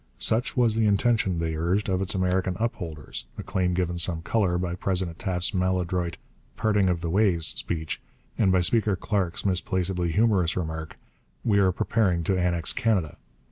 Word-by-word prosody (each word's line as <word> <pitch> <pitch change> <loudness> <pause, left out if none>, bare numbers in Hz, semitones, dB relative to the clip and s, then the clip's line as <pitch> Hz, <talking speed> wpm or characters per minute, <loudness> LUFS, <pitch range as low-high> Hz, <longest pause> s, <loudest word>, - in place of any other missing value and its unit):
Such 115 +4 0
was 120 -3 +4
the 110 -1 +2
intention, 100 -3 +2
they 80 -1 -1
urged, 90 +6 0
of 95 -1 0
its 95 +2 +2
American 95 0 0
upholders, 80 - -4
a - - -5
claim 90 -2 0
given 90 -1 -1
some 85 -2 -1
colour 95 -3 +1
by 90 -1 -2
President 90 -2 -2
Taft's 90 -4 0
maladroit 90 -2 -1 0.4
'parting 105 -3 +2
of 85 -2 -1
the 85 - -2
ways' 95 -4 +2
speech 80 0 -3 0.3
and 100 -4 +3
by 95 -1 +3
Speaker 105 +3 +2
Clark's 95 -2 -2
misplacedly 90 -2 0
humorous 100 -4 +2
remark, 80 -2 -4 0.5
'we 105 -3 +3
are 95 -2 +4
preparing 90 -3 +1
to 95 +4 +1
annex 90 -2 +1
Canada.' 100 - 0
90 Hz, 165 wpm, -26 LUFS, 85-100 Hz, 0.5 s, was